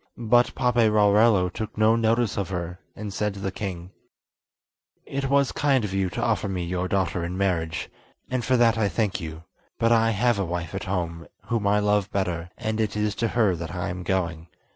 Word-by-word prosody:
But 120 +1 +3
Paperarello 105 -5 +4
took 110 -1 -5
no 110 +1 +4
notice 115 -1 +1
of 100 -1 -2
her, 90 -1 -4 0.2
and 105 -1 -6
said 105 0 -1
to - - -8
the 95 -1 -3
king: 90 -3 -6 1.1
"It 135 0 -3
was 140 -1 +3
kind 135 -6 +2
of 95 - -5
you 95 -1 0
to - - -3
offer 100 - 0
me 90 -2 -2
your 90 +1 -2
daughter 95 -2 0
in 90 +2 -4
marriage, 85 -5 -1 0.4
and 130 -1 -2
for 130 +1 +2
that 115 -2 +4
I 105 -2 +2
thank 100 -2 -1
you; 80 0 -7 0.3
but 115 0 +2
I 115 -1 +4
have 115 0 +2
a - - +1
wife 85 -2 -4
at - - -4
home 85 -3 -3 0.2
whom 115 -4 0
I 100 +1 +4
love 105 -1 +1
better, 90 -3 -2
and 110 0 -2
it 105 -1 -1
is 105 -1 0
to 115 - +3
her 110 -5 +2
that 85 +2 -6
I 90 -1 -2
am 90 +1 -5
going. 85 -3 -2
100 Hz, 205 wpm, -25 LUFS, 90-115 Hz, 1.1 s, Paperarello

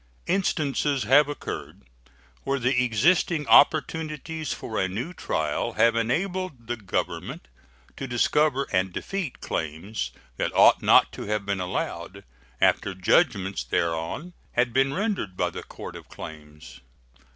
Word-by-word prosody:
Instances 150 - 0
have 140 +6 +5
occurred 145 - -6 0.6
where 140 - 0
the 125 0 +2
existing 150 - +2
opportunities 155 0 +2
for 110 - -4
a 95 - +1
new 120 - -4
trial 75 - -2
have 115 0 +4
enabled 160 - -1
the 120 +1 -2
Government 95 - -4 0.5
to 135 - -4
discover 140 +3 +2
and 95 -1 +1
defeat 185 - -4
claims 80 - -3 0.3
that - - -1
ought - - +6
not - - +5
to - - -7
have 105 -1 -1
been 100 -1 -1
allowed, 90 0 -4 0.4
after 95 - +2
judgments 95 - +2
thereon 85 - -2 0.2
had 120 -1 +1
been 135 +1 +3
rendered 185 - -2
by - - 0
the - - -6
Court - - -9
of - - -11
Claims. 75 -1 -11
125 Hz, 130 wpm, -26 LUFS, 95-150 Hz, 0.6 s, ought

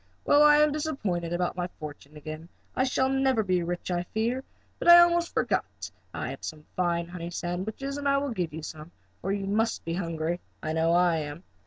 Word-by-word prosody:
"Well, 290 - +5
I 295 0 +7
am 300 0 +5
disappointed 215 - -2
about 175 0 -1
my 180 -1 -2
fortune 150 0 -9
again. 155 +2 -8 0.3
I 260 - +2
shall 260 0 +1
never 265 -4 +2
be 185 -2 +1
rich 175 +1 -3
I 175 -1 0
fear. 230 +8 -2 0.4
But - - -3
I 345 0 +11
almost 345 0 +5
forgot - - +1 0.2
that - - -6 0.2
I - - -4
have - - -9
some 155 -2 -7
fine 170 -2 0
honey 170 -1 -6
sandwiches 200 +11 -4
and 285 -1 0
I 275 - +4
will 280 -1 -1
give 180 -7 -2
you 155 +1 -7
some, 155 +1 -8 0.3
for 195 - -2
you 200 -1 -1
must 220 +3 0
be 165 - -2
hungry. 165 -1 -2 0.2
I 155 - -2
know 160 +1 +2
I 175 -1 +4
am." 150 +2 -5
180 Hz, 210 wpm, -28 LUFS, 165-265 Hz, 0.4 s, I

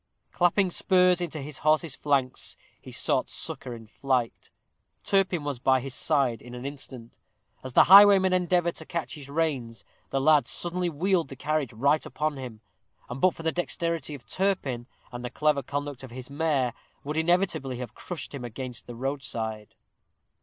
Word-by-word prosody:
Clapping 180 +1 +2
spurs 180 0 +4
into 160 -3 -3
his 150 -1 -7
horse's 155 0 +2
flanks, 135 -3 -1 0.2
he - - -11
sought - - +1
succor 125 - -4
in 115 -1 -11
flight. 125 +1 -2 0.5
Turpin 190 -5 +1
was 145 -4 -3
by 130 +1 +3
his 135 +1 -6
side 135 -6 +1
in 125 0 -10
an 125 +1 -7
instant. 135 -4 -6 0.4
As 130 -1 -7
the - - +8
highwayman 195 0 +8
endeavored 175 -1 +2
to - - -7
catch 170 -2 -4
his 140 -3 -9
reins, 140 -7 -2 0.2
the 135 - 0
lad 145 -2 +4
suddenly 175 +1 -1
wheeled 170 +1 +1
the 135 - -9
carriage 145 0 -1
right 140 +7 +2
upon 150 -1 -2
him, 120 -5 -8 0.5
and 130 +2 -6
but 185 -2 +4
for 165 - -9
the 160 - +1
dexterity 170 -3 -2
of 130 - -13
Turpin, 145 -11 -1 0.2
and 120 0 -7
the 125 - -3
clever 150 +2 +1
conduct 145 0 -4
of 130 - -9
his 125 +2 -9
mare, 140 -5 0 0.3
would 150 +2 -4
inevitably 160 -6 +1
have 120 -3 -6
crushed 165 +2 -7
him 135 -3 -6
against 120 +1 -7
the 120 - -8
roadside. 115 -5 -4
145 Hz, 170 wpm, -27 LUFS, 125-170 Hz, 0.5 s, the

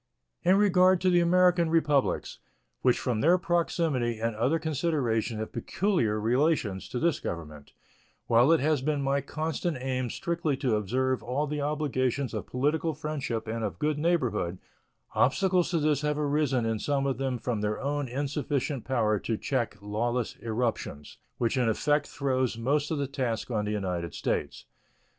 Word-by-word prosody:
In 185 +2 +4
regard 185 -2 +5
to 185 0 +3
the 175 - +5
American 175 -1 +4
Republics, 150 -4 +1 0.4
which 125 -1 +3
from 120 -4 -1
their 175 +4 +5
proximity 165 -8 0
and 115 0 -1
other 125 +9 +1
considerations 140 -9 -1
have 110 - -4
peculiar 170 - 0
relations 120 - +1
to - - -4
this 165 +4 +1
Government, 75 -4 -7 0.5
while 120 +6 +5
it 165 - +5
has 150 -1 +2
been 145 0 0
my 140 +1 +1
constant 160 +1 -3
aim 130 -1 -2
strictly 165 -3 -1
to 125 -5 +1
observe 130 +5 0
all 130 +5 -1
the 150 0 -3
obligations 140 -4 -1
of - - -4
political 150 +5 0
friendship 140 -7 -3
and 115 +1 -3
of 105 - -3
good 150 -1 0
neighborhood, 125 - 0 0.6
obstacles 180 +5 +2
to 170 - +1
this 150 -2 +1
have 150 0 0
arisen 145 -4 +1
in 115 -1 -1
some 140 +3 0
of 135 -2 -1
them 135 -2 -1
from 115 -2 -2
their 105 0 -1
own 145 0 -2
insufficient 140 0 -2
power 110 -5 +1
to 110 +2 -2
cheek 120 -6 -2
lawless 120 +3 -1
irruptions, 110 - -3 0.2
which 120 +2 0
in 125 -3 +2
effect 145 +6 +1
throws 130 -4 -1
most 145 +5 0
of 160 - -1
the 140 - 0
task 125 -4 -3
on 105 -2 0
the 105 - -2
United 90 -5 -3
States. - - -2
135 Hz, 165 wpm, -28 LUFS, 115-155 Hz, 0.6 s, regard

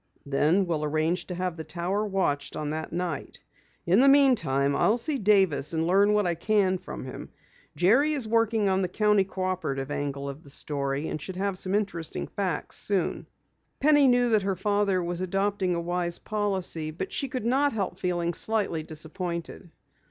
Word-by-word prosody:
"Then 150 +7 +2
we'll 160 -3 -2
arrange 155 +4 -1
to 180 - -5
have 180 -1 -3
the 160 - -5
Tower 175 +6 -2
watched 145 -8 -1
on 150 -1 -3
that 155 0 -4
night. 170 -4 -4 0.5
In 185 +5 +4
the 270 - +6
meantime, 165 - +4
I'll 220 +10 +3
see 280 +3 -1
Davis 190 -8 +3
and 160 0 0
learn 200 +4 +4
what 210 -1 +2
I 175 - +1
can 190 +1 +1
from 185 - -8
him. 130 - -8 0.5
Jerry 255 - +3
is 270 -7 -3
working 225 -2 +2
on 190 0 +2
the 185 - 0
County 210 +1 +2
Cooperative 185 -8 -3
angle 140 -1 -3
of 140 +2 -7
the 140 - -15
story, 140 +1 -2
and 155 - -4
should 190 - -6
have 195 +1 -1
some 185 +1 0
interesting 195 -6 -2
facts 190 -5 -2
soon." 195 -4 -1 0.5
Penny 290 -1 +5
knew 245 -1 +3
that 215 -2 +3
her 195 0 -1
father 200 -1 +1
was 175 +1 -3
adopting 195 0 0
a - - -1
wise 175 0 -2
policy, 190 -7 -1
but 155 - -6
she 275 - -1
could 255 -3 -5
not 275 +4 +2
help 205 -4 -3
feeling 175 -1 -1
slightly 205 -7 +1
disappointed. 170 +3 -5
185 Hz, 180 wpm, -27 LUFS, 160-205 Hz, 0.5 s, the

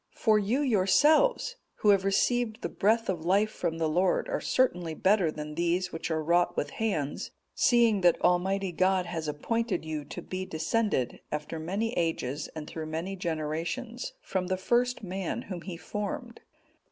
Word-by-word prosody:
For 215 -2 +3
you 220 +8 0
yourselves, 290 - +3 0.2
who 210 - +2
have 200 -2 +5
received 220 +3 +1
the 170 - -1
breath 225 +5 +2
of 175 -4 -2
life 200 +5 +2
from 165 -5 -2
the 165 -1 +1
Lord, 180 - +1
are - - -1
certainly 175 -11 +1
better 190 -2 +3
than 150 0 -6
these 175 +2 0
which 165 - -4
are 160 -1 -1
wrought 175 +2 +2
with - - -1
hands, 160 -11 -2 0.2
seeing 235 -4 +4
that 175 -2 +4
Almighty 190 +2 +2
God 185 +1 +2
has 160 -2 -4
appointed 190 +5 -1
you 155 -2 -3
to 170 +4 -7
be 185 0 -4
descended, 185 - -1
after 150 +2 -4
many 200 +8 -2
ages 160 - -1
and 155 -1 -5
through 160 -1 -6
many 165 +5 -3
generations, 170 +8 -3
from 185 -1 -2
the 185 0 0
first 245 +5 +1
man 190 +5 -3
whom 185 -4 -6
he 175 -1 -6
formed. 230 - -5
185 Hz, 165 wpm, -29 LUFS, 165-215 Hz, 0.2 s, have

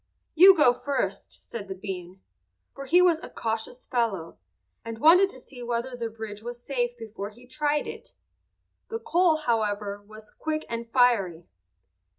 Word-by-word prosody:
"You 370 +3 +8
go 270 -5 +6
first," 280 +3 -3
said 205 -4 -7
the 190 - -5
bean, 185 -1 -7 0.5
for 275 - -8
he 350 +6 +5
was 340 -3 +4
a - - -9
cautious 225 +2 -4
fellow, 200 - -2 0.4
and 230 0 -6
wanted 350 - +6
to 260 - -11
see 250 0 -12
whether 240 +1 -3
the 235 -2 -3
bridge 220 -2 -8
was 240 +1 -7
safe 245 -2 -2
before 220 -3 -7
he 240 +4 -17
tried 295 +3 0
it. - - -9 0.7
The 450 - -2
coal, 365 -7 +3
however, 210 -7 -1
was 215 +1 -13
quick 310 -1 -3
and 230 0 -5
fiery. 220 -10 +2
235 Hz, 160 wpm, -26 LUFS, 215-290 Hz, 0.7 s, You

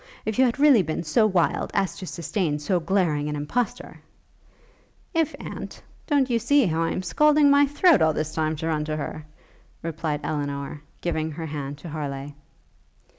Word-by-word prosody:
If 220 +3 -2
you 260 - +7
had 240 - 0
really 280 -6 +6
been 160 -1 -3
so 215 +8 +3
wild 185 -5 +1
as 195 -2 0
to 185 - -7
sustain 170 -2 -2
so 175 +5 0
glaring 160 -5 0
an 150 - -3
impostor 230 +11 -3 0.6
' - - -34
'If, 325 -2 +1
aunt? - - -8 0.2
don't 285 -4 +3
you 235 -2 +1
see 275 +3 +3
how 165 -2 0
I 165 - +1
am 185 - -3
scalding 295 - +4
my 285 0 +5
throat 305 +3 +4
all 160 0 +4
this 155 0 -3
time 155 0 0
to 160 +2 -4
run 155 -2 0
to 155 0 -2
her?' 155 0 -6 0.6
replied 160 -2 -3
Elinor, 145 -1 -3 0.2
giving 160 -2 -1
her 160 +1 -6
hand 145 -2 -5
to 165 +3 -9
Harleigh. 145 -2 -5
165 Hz, 180 wpm, -25 LUFS, 150-235 Hz, 0.6 s, you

